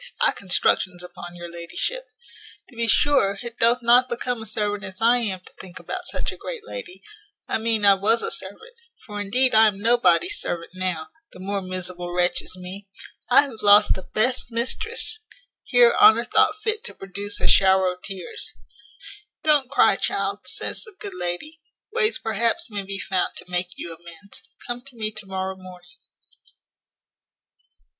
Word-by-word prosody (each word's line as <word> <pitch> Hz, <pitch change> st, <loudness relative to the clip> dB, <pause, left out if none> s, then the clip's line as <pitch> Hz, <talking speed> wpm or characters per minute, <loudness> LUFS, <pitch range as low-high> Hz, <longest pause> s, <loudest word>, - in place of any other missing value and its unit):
I -, -, +4 dB
constructions 180 Hz, -1 st, 0 dB
upon 175 Hz, 0 st, -10 dB
your 175 Hz, 0 st, -8 dB
ladyship 170 Hz, -, -4 dB, 0.6 s
to 250 Hz, -, -19 dB
be 230 Hz, 0 st, -1 dB
sure 225 Hz, -2 st, +3 dB
it 235 Hz, -1 st, -8 dB
doth 235 Hz, +2 st, +3 dB
not 245 Hz, +2 st, +5 dB
become 240 Hz, 0 st, -3 dB
a 220 Hz, -, -8 dB
servant 205 Hz, 0 st, -2 dB
as 190 Hz, -1 st, -8 dB
I 235 Hz, +2 st, +5 dB
am 200 Hz, -6 st, -2 dB
to -, -, -16 dB
think 185 Hz, -2 st, -12 dB
about -, -, -6 dB
such -, -, -2 dB
a -, -, -10 dB
great 475 Hz, -3 st, -7 dB
lady 440 Hz, -8 st, -9 dB, 0.4 s
I -, -, -1 dB
mean 220 Hz, -2 st, +1 dB
I 200 Hz, -, +8 dB
was 215 Hz, +4 st, +2 dB
a -, -, -1 dB
servant: 200 Hz, -, -7 dB, 0.3 s
for 210 Hz, -2 st, -6 dB
indeed 250 Hz, +6 st, +1 dB
I 220 Hz, 0 st, +7 dB
am 200 Hz, -2 st, -2 dB
nobody's 245 Hz, -, +3 dB
servant 170 Hz, -1 st, -4 dB
now, 185 Hz, -, -3 dB, 0.2 s
the -, -, -13 dB
more 200 Hz, +1 st, -3 dB
miserable 180 Hz, -1 st, -5 dB
wretch 180 Hz, 0 st, +2 dB
is 185 Hz, -, -8 dB
me. 185 Hz, +2 st, -8 dB, 0.4 s
I 255 Hz, +3 st, +8 dB
have 260 Hz, -6 st, -8 dB
lost 205 Hz, 0 st, +7 dB
the 190 Hz, -, -6 dB
best 245 Hz, +7 st, 0 dB
mistress 440 Hz, -, -2 dB, 0.2 s
" -, -, -42 dB
Here 485 Hz, -1 st, +5 dB
Honour 425 Hz, +1 st, +7 dB
thought -, -, +2 dB
fit 435 Hz, +1 st, -2 dB
to -, -, -9 dB
produce 200 Hz, +2 st, -5 dB
a -, -, 0 dB
shower 190 Hz, -1 st, +4 dB
of 180 Hz, -, -18 dB
tears. 190 Hz, -3 st, -7 dB, 0.9 s
"Don't 295 Hz, -4 st, +3 dB
cry, 280 Hz, -, +4 dB
child," -, -, -2 dB
says -, -, -3 dB
the 440 Hz, -4 st, -14 dB
good 405 Hz, -2 st, -6 dB
lady; 305 Hz, -, -4 dB, 0.3 s
"ways 455 Hz, -1 st, +2 dB
perhaps 230 Hz, -1 st, 0 dB
may 205 Hz, -1 st, -3 dB
be 195 Hz, 0 st, -5 dB
found 190 Hz, -1 st, -1 dB
to -, -, -8 dB
make 180 Hz, 0 st, -3 dB
you 170 Hz, -, -6 dB
amends. 170 Hz, +3 st, -12 dB, 0.2 s
Come 240 Hz, 0 st, -4 dB
to 265 Hz, 0 st, -12 dB
me 215 Hz, -2 st, -3 dB
to 215 Hz, -2 st, -11 dB
morrow 190 Hz, 0 st, -3 dB
morning." 185 Hz, 0 st, -14 dB
210 Hz, 175 wpm, -23 LUFS, 185-250 Hz, 0.9 s, I